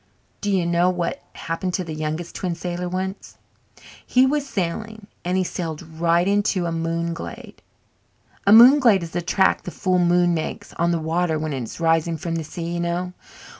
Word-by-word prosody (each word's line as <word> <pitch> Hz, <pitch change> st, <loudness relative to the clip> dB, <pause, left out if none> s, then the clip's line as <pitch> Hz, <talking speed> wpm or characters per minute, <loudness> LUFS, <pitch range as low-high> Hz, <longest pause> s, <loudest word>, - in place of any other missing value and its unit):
Do 205 Hz, -, -2 dB
you 190 Hz, -3 st, +1 dB
know 170 Hz, +1 st, +2 dB
what 175 Hz, -2 st, -2 dB
happened 175 Hz, +2 st, -3 dB
to 185 Hz, -, -1 dB
the 165 Hz, -2 st, -6 dB
Youngest 155 Hz, +2 st, -4 dB
Twin 180 Hz, -2 st, -3 dB
Sailor 175 Hz, +1 st, -4 dB
once? 190 Hz, +2 st, -5 dB, 0.7 s
He 255 Hz, +1 st, +4 dB
was 285 Hz, +1 st, 0 dB
sailing 210 Hz, +3 st, -3 dB, 0.2 s
and 180 Hz, +1 st, 0 dB
he 185 Hz, -, +2 dB
sailed 165 Hz, -3 st, -4 dB
right 170 Hz, +2 st, +1 dB
into 200 Hz, -2 st, +1 dB
a 170 Hz, -, -1 dB
moonglade. 165 Hz, 0 st, -4 dB, 0.9 s
A -, -, +6 dB
moonglade 235 Hz, -3 st, +7 dB
is 165 Hz, -, -7 dB
the 175 Hz, -, -2 dB
track 190 Hz, +3 st, +2 dB
the -, -, -7 dB
full 185 Hz, +1 st, 0 dB
moon 175 Hz, 0 st, +3 dB
makes 160 Hz, -2 st, -4 dB
on 170 Hz, -, 0 dB
the 170 Hz, -, +1 dB
water 165 Hz, +1 st, 0 dB
when 155 Hz, -1 st, -3 dB
it 135 Hz, -, -3 dB
is 115 Hz, -, -7 dB
rising 165 Hz, 0 st, +1 dB
from 165 Hz, +2 st, -4 dB
the 165 Hz, -1 st, -2 dB
sea, 160 Hz, +3 st, -7 dB
you 175 Hz, -, -2 dB
know. 175 Hz, +1 st, -2 dB
175 Hz, 185 wpm, -22 LUFS, 165-185 Hz, 0.9 s, moonglade